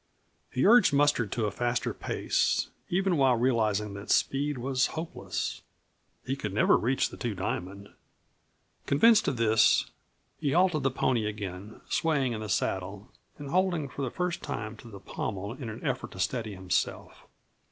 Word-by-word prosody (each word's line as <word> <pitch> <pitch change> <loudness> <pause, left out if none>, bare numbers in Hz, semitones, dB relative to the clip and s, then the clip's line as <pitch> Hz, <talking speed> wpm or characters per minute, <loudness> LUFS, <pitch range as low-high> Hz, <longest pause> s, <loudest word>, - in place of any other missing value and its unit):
He 130 - 0
urged 230 -2 +7
Mustard 140 -7 +2
to 115 -2 0
a 105 - -1
faster 120 +3 -1
pace, - - 0 0.2
even 185 -1 +1
while 135 -3 +4
realizing 110 -4 +1
that 100 +1 -9
speed 145 +1 +1
was 130 +1 +1
hopeless. 160 +1 -4 0.6
He 130 - -1
could 105 -7 -4
never - - +5
reach 130 +4 +1
the - - -9
Two 120 -5 -3
Diamond. 95 +2 -4 1.0
Convinced 220 +10 +5
of 130 - 0
this, 110 -1 +3 0.5
he 145 -3 0
halted 175 -3 +3
the 135 - +2
pony 120 -4 0
again, 100 -1 -6
swaying 140 -6 +1
in 110 - -5
the 110 - -5
saddle 95 +2 -2 0.3
and 145 -2 -7
holding, 180 -5 +1
for 140 - -7
the 130 - -1
first 180 +2 -2
time, 105 +2 -5
to 115 - -12
the 100 -3 -10
pommel 100 +1 -4
in 125 -3 -7
an 110 +7 -8
effort 130 -3 -2
to 95 - -10
steady 110 +1 -2
himself. 95 -1 -3
120 Hz, 165 wpm, -28 LUFS, 105-145 Hz, 1.0 s, urged